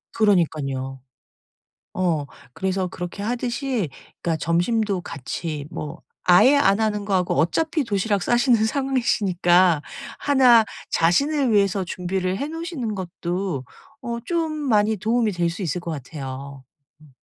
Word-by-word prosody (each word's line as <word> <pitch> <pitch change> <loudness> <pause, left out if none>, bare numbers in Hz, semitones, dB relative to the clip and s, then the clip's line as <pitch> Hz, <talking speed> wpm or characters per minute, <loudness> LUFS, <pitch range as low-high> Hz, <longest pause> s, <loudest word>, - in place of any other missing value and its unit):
그러니깐요. 145 - +1 0.9
어. 165 -6 0 0.3
그래서 190 0 -1
그렇게 180 +2 -6
하듯이 240 - -2 0.3
그러니까 165 -2 0
점심도 185 +5 +1
같이 150 0 -5
뭐 150 -1 -7 0.2
아예 215 +11 +6
안 200 -7 +4
하는 210 -2 0
거하고 185 -3 +1
어차피 310 - +1
도시락 205 -2 0
싸시는 240 -2 +3
상황이시니까 185 - +2 0.4
1 255 -5 +5 0.3
자신을 265 - +2
위해서 200 -2 +2
준비를 185 +1 -2
해 285 - -3
놓으시는 320 - -4
것도 175 -4 -3 0.4
어 235 -1 -4
좀 330 -2 0
많이 220 -8 +1
도움이 225 +1 +1
될 175 -1 0
수 180 +4 -6
있을 175 +1 -2
것 170 - -5
같아요. 140 -1 -7 0.4
음. 155 - -18
195 Hz, 280 characters per minute, -23 LUFS, 170-235 Hz, 0.9 s, 아예